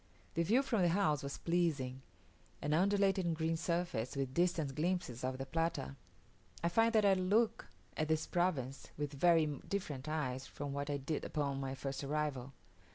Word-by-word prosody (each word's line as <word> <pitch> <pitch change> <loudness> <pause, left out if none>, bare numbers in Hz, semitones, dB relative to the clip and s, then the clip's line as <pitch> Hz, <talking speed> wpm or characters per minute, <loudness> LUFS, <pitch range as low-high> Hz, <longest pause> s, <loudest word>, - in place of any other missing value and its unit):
The 170 - +1
view 230 +11 +3
from 235 -7 +1
the 175 - +5
house 165 -5 +2
was 140 0 -5
pleasing; 150 -7 0 0.6
an 150 +1 -1
undulating 195 -1 +3
green 160 +1 0
surface, 170 -6 -1
with 135 -2 -2
distant 170 -4 +1
glimpses 155 -6 -1
of 130 0 -1
the 135 - -4
Plata. 165 - -1 0.7
I 170 - +3
find 225 +5 +4
that 215 -2 +4
I 195 - +6
look 200 +5 +2 0.3
at 155 - 0
this 160 0 +1
province 145 -7 -1
with 145 -1 -3
very 165 +2 +5
different 150 -1 -4
eyes 135 -4 -2
from 145 -1 -5
what 140 +1 -3
I 145 - 0
did 140 +3 -3
upon 140 -3 -1
my 135 -1 -3
first 135 +1 -4
arrival. 140 -3 -2
155 Hz, 170 wpm, -35 LUFS, 135-175 Hz, 0.7 s, I